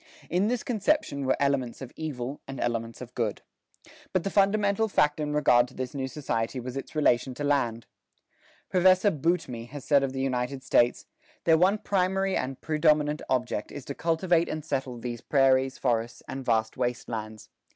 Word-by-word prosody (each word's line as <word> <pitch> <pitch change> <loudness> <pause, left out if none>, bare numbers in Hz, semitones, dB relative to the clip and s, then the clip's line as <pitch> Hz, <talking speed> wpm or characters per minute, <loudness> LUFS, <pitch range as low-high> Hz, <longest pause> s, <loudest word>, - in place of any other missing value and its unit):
In 185 +4 +2
this 245 0 -1
conception 210 - 0
were 130 - +2
elements 140 -4 0
of 130 -3 -9
evil 140 -3 -5
and 135 -1 -7
elements 115 -1 -2
of 125 0 -9
good. 115 -5 -2 0.7
But 185 -3 +1
the 195 - -2
fundamental 200 +1 +2
fact 150 -7 +2
in 150 -1 -2
regard 125 -5 +4
to - - -17
this 130 -1 -4
new 135 -2 -3
society 125 -3 -2
was 125 +1 -6
its 135 - -6
relation 130 -3 +2
to 145 - -5
land. 125 -6 0 0.8
Professor 185 +2 +4
Boutmy 155 -7 -1
has 135 +2 -9
said 140 -2 +4
of 135 -1 -1
the 135 - -5
United 130 0 -2
States, 120 -2 +2 0.4
"Their 165 - +5
one 185 +5 +4
primary 195 -1 0
and 130 0 -3
predominant 150 -1 +2
object 125 -4 -1
is 140 -3 -8
to 140 - -4
cultivate 170 +2 +1
and 155 -1 -4
settle 130 -4 -2
these 120 0 -5
prairies, 135 -1 +3
forests, 115 -2 -1
and 135 0 -5
vast 110 -2 0
waste 125 -1 -2
lands. 110 -2 -6
135 Hz, 175 wpm, -27 LUFS, 125-165 Hz, 0.8 s, Their